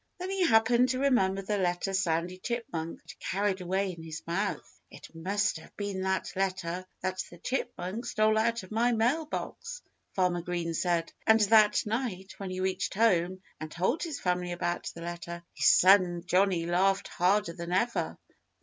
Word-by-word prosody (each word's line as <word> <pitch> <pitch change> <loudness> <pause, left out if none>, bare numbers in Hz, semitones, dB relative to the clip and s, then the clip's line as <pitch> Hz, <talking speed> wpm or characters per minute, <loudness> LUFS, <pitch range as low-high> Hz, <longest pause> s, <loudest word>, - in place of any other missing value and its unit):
Then 365 +1 -4
he 390 -1 +1
happened 235 +2 +4
to 255 0 0
remember 195 -8 +2
the 205 +1 -1
letter 180 +1 0
Sandy 180 0 0
Chipmunk 180 -9 -4
had 160 -4 -13
carried 195 0 -1
away 190 +2 0
in 170 -2 -10
his 160 -1 -7
mouth. 195 +5 -3
"It - - -13
must 200 +6 -1
have - - -17
been 200 -2 -3
that 190 0 -1
letter 185 -1 -2
that 185 0 -2
the 175 - -13
chipmunk 235 -1 -3
stole 215 0 +2
out 230 -1 0
of 185 - -13
my 235 +3 +2
mail 250 +8 +1
box!" 485 +9 -6 0.3
Farmer 180 -2 +1
Green 170 -1 -3
said. 170 0 0
And 220 0 +6
that 210 0 +5
night, 210 -4 -3
when 195 -2 -5
he 185 0 -4
reached 190 0 -1
home 185 -4 +2 0.2
and 155 0 -6
told 190 - 0
his 315 -5 -4
family 180 -1 -1
about 175 0 -2
the 170 - -9
letter, 170 0 -6
his - - +2
son 180 -2 +5
Johnnie 180 -2 +2
laughed 190 +3 +2
harder 185 0 +1
than 170 0 -6
ever. 230 +6 0
190 Hz, 175 wpm, -29 LUFS, 175-220 Hz, 0.3 s, And